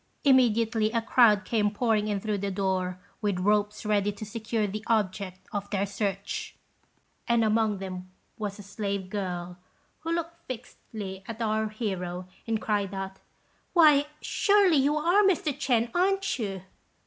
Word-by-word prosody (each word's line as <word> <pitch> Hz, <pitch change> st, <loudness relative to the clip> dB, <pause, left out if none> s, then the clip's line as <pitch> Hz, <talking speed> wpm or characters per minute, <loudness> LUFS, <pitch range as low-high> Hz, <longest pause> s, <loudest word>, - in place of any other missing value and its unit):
Immediately 230 Hz, -5 st, +4 dB
a 230 Hz, -, +2 dB
crowd 220 Hz, -3 st, +5 dB
came 210 Hz, -3 st, +2 dB
pouring 215 Hz, 0 st, +1 dB
in 205 Hz, -2 st, 0 dB
through 210 Hz, 0 st, -2 dB
the 200 Hz, +1 st, -2 dB
door, 185 Hz, -2 st, -1 dB, 0.2 s
with 205 Hz, -3 st, 0 dB
ropes 210 Hz, +3 st, +1 dB
ready 205 Hz, -1 st, +2 dB
to 205 Hz, +1 st, -8 dB
secure 220 Hz, +1 st, -2 dB
the 210 Hz, +2 st, -4 dB
object 195 Hz, -4 st, 0 dB
of 200 Hz, 0 st, -3 dB
their 200 Hz, -1 st, 0 dB
search; 200 Hz, -, -3 dB, 0.7 s
and 235 Hz, -1 st, +3 dB
among 215 Hz, -1 st, +2 dB
them 185 Hz, -1 st, -6 dB, 0.3 s
was 210 Hz, -2 st, -4 dB
a 205 Hz, -, -10 dB
slave 200 Hz, -2 st, -4 dB
girl, 180 Hz, -3 st, -4 dB, 0.4 s
who 330 Hz, -, -4 dB
looked 335 Hz, 0 st, -4 dB
fixedly 215 Hz, -5 st, -7 dB
at 230 Hz, 0 st, -6 dB
our 220 Hz, -1 st, 0 dB
hero, 185 Hz, -5 st, -4 dB, 0.2 s
and 225 Hz, -1 st, 0 dB
cried 205 Hz, -2 st, -1 dB
out, 195 Hz, 0 st, -5 dB, 0.5 s
"Why, 300 Hz, -4 st, +6 dB
surely 400 Hz, -5 st, +4 dB
you 285 Hz, +3 st, +3 dB
are 345 Hz, +7 st, +4 dB
Mr. 360 Hz, -7 st, +2 dB
Ch'ên, 240 Hz, -5 st, +1 dB
aren't 390 Hz, -1 st, +1 dB
you?" 195 Hz, -4 st, -3 dB
215 Hz, 150 wpm, -28 LUFS, 195-240 Hz, 0.7 s, Why